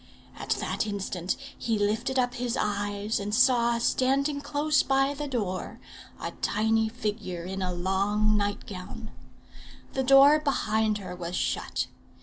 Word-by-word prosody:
At -, -, -7 dB
that -, -, -2 dB
instant 195 Hz, -3 st, -2 dB, 0.2 s
he 225 Hz, -2 st, -1 dB
lifted 220 Hz, +6 st, 0 dB
up 245 Hz, -1 st, +1 dB
his 245 Hz, -1 st, -2 dB
eyes 205 Hz, +1 st, -1 dB
and 205 Hz, +1 st, -2 dB
saw, 235 Hz, -1 st, +4 dB
standing 275 Hz, +4 st, +1 dB
close 290 Hz, 0 st, +2 dB
by 270 Hz, +1 st, +2 dB
the 295 Hz, +1 st, -4 dB
door, 205 Hz, -9 st, -3 dB, 0.4 s
a -, -, -4 dB
tiny 220 Hz, +1 st, +2 dB
figure 210 Hz, -6 st, -4 dB
in 190 Hz, +2 st, -5 dB
a 185 Hz, -1 st, -1 dB
long 200 Hz, +4 st, +1 dB
night 205 Hz, 0 st, -1 dB
gown. 205 Hz, +3 st, -8 dB, 0.8 s
The 265 Hz, -, 0 dB
door 275 Hz, +3 st, +7 dB
behind 220 Hz, -7 st, +1 dB
her 185 Hz, -3 st, -7 dB
was 175 Hz, 0 st, -5 dB
shut. -, -, -1 dB
220 Hz, 140 wpm, -27 LUFS, 200-255 Hz, 0.8 s, door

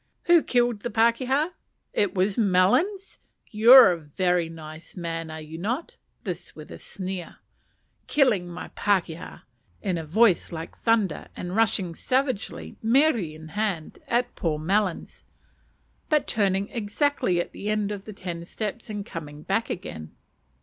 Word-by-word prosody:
Who 345 Hz, -1 st, +6 dB
killed 240 Hz, -5 st, +1 dB
the 240 Hz, -, -4 dB
pakeha? 250 Hz, -, +2 dB, 0.4 s
It 205 Hz, -2 st, +1 dB
was 190 Hz, +2 st, +1 dB
Melons. 230 Hz, -, +2 dB, 0.3 s
You 220 Hz, +3 st, +5 dB
are 205 Hz, -11 st, +8 dB, 0.4 s
a 165 Hz, -1 st, -3 dB
nice 160 Hz, +1 st, -11 dB
man, 165 Hz, -2 st, -4 dB
are 155 Hz, 0 st, -6 dB
you 155 Hz, +1 st, -8 dB
not? 260 Hz, -, -3 dB, 0.3 s
(this -, -, -6 dB
with -, -, -11 dB
a -, -, -9 dB
sneer.) 185 Hz, -2 st, -6 dB, 0.7 s
Killing 220 Hz, -11 st, +3 dB
my 175 Hz, +1 st, -7 dB
pakeha! 180 Hz, -5 st, -1 dB, 0.4 s
(in 180 Hz, -4 st, -1 dB
a -, -, -5 dB
voice 185 Hz, +4 st, +3 dB
like 165 Hz, -1 st, -7 dB
thunder, 220 Hz, -7 st, +1 dB
and 180 Hz, +1 st, -5 dB
rushing 215 Hz, -6 st, +1 dB
savagely, 255 Hz, -, -2 dB
mere 270 Hz, +7 st, +4 dB
in 160 Hz, -6 st, -6 dB
hand, 200 Hz, -5 st, -3 dB
at 240 Hz, +1 st, 0 dB
poor 160 Hz, -3 st, -1 dB
Melons, 185 Hz, +4 st, -1 dB, 0.9 s
but 300 Hz, -2 st, +3 dB
turning 200 Hz, -1 st, +1 dB
exactly 225 Hz, -, 0 dB
at 175 Hz, -, -3 dB
the 205 Hz, -, -5 dB
end 210 Hz, -1 st, 0 dB
of 200 Hz, -1 st, -6 dB
the 215 Hz, -, -8 dB
ten 175 Hz, -3 st, -6 dB
steps 215 Hz, +5 st, -5 dB
and 205 Hz, -2 st, -4 dB
coming 150 Hz, -4 st, -8 dB
back 225 Hz, +4 st, 0 dB
again.) 80 Hz, -, -6 dB
200 Hz, 145 wpm, -25 LUFS, 170-230 Hz, 0.9 s, are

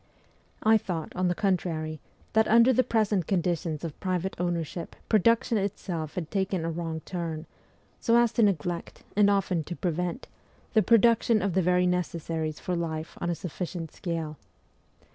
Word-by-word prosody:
I 220 Hz, 0 st, +6 dB
thought, 180 Hz, -7 st, -5 dB
on 185 Hz, 0 st, +1 dB
the 175 Hz, -, +1 dB
contrary, 165 Hz, -6 st, -1 dB, 0.3 s
that 220 Hz, 0 st, +4 dB
under 235 Hz, +3 st, +6 dB
the 255 Hz, -, +4 dB
present 215 Hz, -7 st, +1 dB
conditions 170 Hz, -4 st, -1 dB
of 165 Hz, -4 st, -6 dB
private 185 Hz, 0 st, -1 dB
ownership 170 Hz, -1 st, -3 dB
production 230 Hz, +1 st, +3 dB
itself 170 Hz, -5 st, -3 dB
had 165 Hz, -4 st, -4 dB
taken 190 Hz, -3 st, 0 dB
a 165 Hz, -, -1 dB
wrong 165 Hz, -1 st, -4 dB
turn, 165 Hz, -3 st, -4 dB, 0.5 s
so 230 Hz, 0 st, +3 dB
as 235 Hz, -1 st, +4 dB
to 235 Hz, -, +1 dB
neglect, 175 Hz, -4 st, 0 dB
and 205 Hz, 0 st, +5 dB
often 190 Hz, -4 st, +1 dB
to 175 Hz, -, -5 dB
prevent, 180 Hz, -, -2 dB, 0.5 s
the 220 Hz, -, +5 dB
production 230 Hz, 0 st, +4 dB
of 200 Hz, -3 st, 0 dB
the 190 Hz, -, +3 dB
very 180 Hz, +1 st, +3 dB
necessaries 165 Hz, -3 st, -2 dB
for 180 Hz, -, -2 dB
life 160 Hz, -2 st, -3 dB
on 175 Hz, -, -1 dB
a 170 Hz, -, 0 dB
sufficient 170 Hz, 0 st, -5 dB
scale. 165 Hz, -3 st, -4 dB
180 Hz, 160 wpm, -28 LUFS, 165-205 Hz, 0.5 s, I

